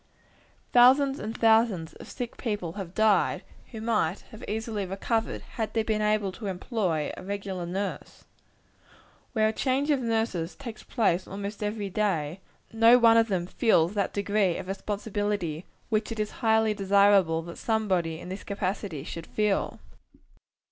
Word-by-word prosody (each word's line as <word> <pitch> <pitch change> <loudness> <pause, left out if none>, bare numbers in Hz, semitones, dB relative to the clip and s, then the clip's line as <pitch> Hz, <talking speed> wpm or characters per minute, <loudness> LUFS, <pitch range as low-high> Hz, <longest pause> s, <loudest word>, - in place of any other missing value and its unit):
Thousands 270 +3 +6
and 220 +2 -5
thousands 220 -7 +3
of - - -12
sick 245 -3 -5
people 205 -8 -3
have 185 -1 -7
died, 215 -2 +3 0.3
who 225 - -7
might 210 -6 0 0.2
easily 220 0 -3
have 190 - -4
recovered, 220 +4 -1
had 220 -1 -5
they 225 - +2
been 215 -1 0
able 210 -2 +1
to 205 +2 -7
employ 185 - -1
a - - -9
regular 195 -2 -4
nurse. 195 +3 -5 1.1
Where 215 -2 +3
a 220 - 0
change 275 +5 0
of 285 - +2
nurses 220 -7 -1
takes 235 -6 -8
place 190 -5 0
almost 200 +2 -6
every 210 -1 -3
day, 180 -5 -1 0.3
no 230 +2 +7
one 230 -2 +6
of 230 0 +5
them 185 -5 -1
feels 180 -3 +2
that 200 -2 0
degree 200 -3 +1
of - - -7
responsibility 205 -4 -3 0.2
which 215 0 0
it 225 - -5
is 210 0 -1
highly 220 -1 +3
desirable 195 -4 +4
that 170 0 -9
somebody, 185 -8 0
in 180 - -9
this 190 +2 -6
capacity, 195 -6 -3
should 165 +1 -7
feel. 210 -2 0
205 Hz, 155 wpm, -27 LUFS, 185-225 Hz, 1.1 s, no